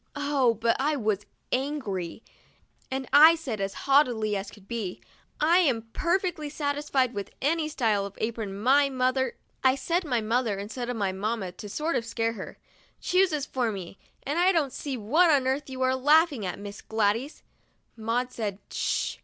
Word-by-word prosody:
Oh, 285 -5 +2
but 230 +2 +1
I 295 +3 +1
was 210 -5 -1 0.2
angry, 240 - -2 0.7
and 265 0 -3
I 310 +3 +9
said, 255 -11 -5
as 195 0 -2
haughtily 245 -7 +3
as 195 0 -4
could 200 -2 -16
be: 220 -6 -4 0.4
"I 330 +4 +5
am 235 -10 +1
perfectly 345 -4 0
satisfied 285 -3 0
with 200 -2 -5
any 310 +2 0
style 220 -9 +1
of 200 - -15
apron 220 -3 -3
my 275 +5 +4
mother" 260 0 0 0.3
(I 260 0 +5
said 335 +7 0
mother 235 -5 0
instead 230 +5 -5
of 245 - -2
mamma 200 0 -2
to 205 +3 -9
sort 310 +10 -1
of - - 0
scare 230 0 -1
her) 200 -4 -8 0.2
" - - -34
chooses 355 -6 +2
for 245 -5 -1
me, 190 -2 -8 0.2
and 290 +5 -1
I 365 +2 +5
don't 305 -7 0
see 275 -3 -4
what 300 +12 +3
on 280 -4 +4
earth 270 +2 -1
you 260 0 -3
are 260 0 +2
laughing 290 - +3
at, 180 - -4
Miss 205 0 -8
Gladys." 225 +6 -1 0.5
Maud 235 +3 -1
said 210 -5 -3
"Sh!" - - -1
255 Hz, 170 wpm, -27 LUFS, 215-290 Hz, 0.7 s, I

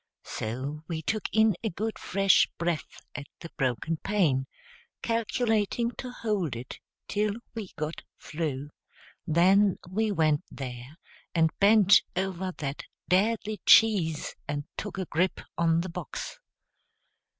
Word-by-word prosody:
So 130 +7 -4
we 160 -1 -4
took 215 +6 -1
in 220 -2 +4
a 220 - 0
good 215 +5 -4
fresh 195 0 +3
breath 170 -3 -3
at 140 0 -7
the 165 - -8
broken 135 +5 -1
pane, 150 -10 +1 0.6
calculating 230 0 0
to 255 - -4
hold 205 - -2
it 120 +2 -8 0.3
till 210 0 0 0.2
we 220 -4 -5
got 155 +2 -4 0.2
through; 150 -3 -4 0.6
then 185 +4 +4
we 215 +4 0
went 155 -5 +2
there 125 +2 -8 0.4
and 160 -1 +4
bent 205 -1 +7
over 190 0 -2
that 140 -1 -4 0.3
deadly 210 +3 +1
cheese 190 -9 +5
and 145 0 -2
took 205 -2 -5
a 190 - -2
grip 180 +4 0 0.2
on 165 0 +2
the 185 - -5
box. 175 - -6
180 Hz, 130 wpm, -28 LUFS, 150-210 Hz, 0.6 s, bent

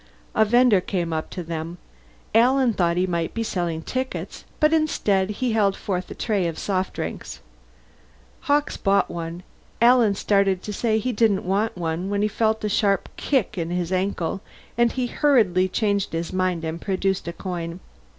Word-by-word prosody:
A 220 - +4
vender 240 -3 +4
came 175 -3 -2
up 155 0 -3
to 180 - -6
them. 165 +1 -5 0.6
Alan 250 +2 +4
thought 175 -3 +1
he 180 - +2
might 170 -3 -2
be 230 - -1
selling 170 -6 -2
tickets, 260 +6 -4
but 305 0 +4
instead 210 -12 +1
he 240 +4 -1
held 205 -3 +2
forth 185 -2 -3
a - - -7
tray 200 -6 0
of 165 -1 -4
soft 190 -2 -1
drinks. - - -6 1.1
Hawkes 290 +1 +2
bought 195 -1 +2
one; 170 +1 -6 0.4
Alan 235 -3 +5
started 195 -2 +1
to 210 - -5
say 220 +1 +1
he 250 +4 -1
didn't 210 -4 +2
want 200 +3 0
one 170 +2 -2
when 205 0 0
he - - +3
felt 220 +1 0
a - - +1
sharp 200 -1 +1
kick 225 -8 0
in 165 0 -2
his 175 0 -2
ankle, 185 -1 -1 0.3
and 235 0 +3
he 255 -1 -1
hurriedly 225 - +3
changed 200 -1 0
his 165 +2 -3
mind 185 -3 0
and 160 +1 -4
produced 190 -2 -1
a 170 - -3
coin. 170 -1 -5
195 Hz, 175 wpm, -23 LUFS, 175-220 Hz, 1.1 s, Alan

